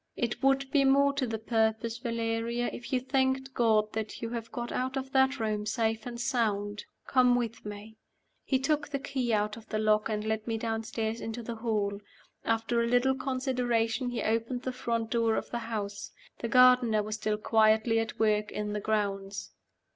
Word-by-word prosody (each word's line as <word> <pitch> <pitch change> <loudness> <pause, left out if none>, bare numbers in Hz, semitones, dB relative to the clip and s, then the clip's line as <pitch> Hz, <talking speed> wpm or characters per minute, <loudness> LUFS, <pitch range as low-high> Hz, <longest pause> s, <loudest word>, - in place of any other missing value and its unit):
"It 235 -2 -2
would 270 0 +2
be 285 -2 +4
more 280 +1 +4
to 275 -2 -1
the 225 -1 -2
purpose, 225 +1 0
Valeria, 230 0 -1
if 245 - -8
you 260 - +2
thanked 265 0 0
God 215 -3 +2
that 220 -1 -4
you 230 0 -4
have 230 -1 -5
got 240 0 -4
out 260 +2 -2
of 265 0 -4
that 265 0 +3
room 215 -1 -1
safe 225 +1 -1
and 235 -1 -6
sound. 210 -4 -1 0.2
Come 250 -2 +4
with 230 -2 -2
me." 210 +1 -9 0.5
He 265 - +1
took 295 +2 0
the 285 - -1
key 265 -3 -2
out 210 0 0
of 225 - -14
the 215 - -1
lock, 215 0 +2
and 210 -1 -2
led 220 0 -2
me 225 -1 -1
downstairs 225 0 -2
into 225 +1 -5
the 230 0 -5
hall. 210 -3 -1 0.4
After 225 +1 +1
a 235 - +1
little 245 +2 +3
consideration, 255 -2 0
he 245 - -3
opened 230 +3 -1
the 255 - -2
front 230 -3 -2
door 230 -2 +2
of - - -3
the 240 - -2
house. 210 -3 -4 0.3
The 235 - -2
gardener 250 -3 +5
was 215 +1 -4
still 215 0 -1
quietly 220 +1 +3
at 225 -1 -3
work 210 -1 +2
in 210 0 -3
the 210 - -2
grounds. 200 -2 -2
230 Hz, 190 wpm, -29 LUFS, 220-250 Hz, 0.5 s, gardener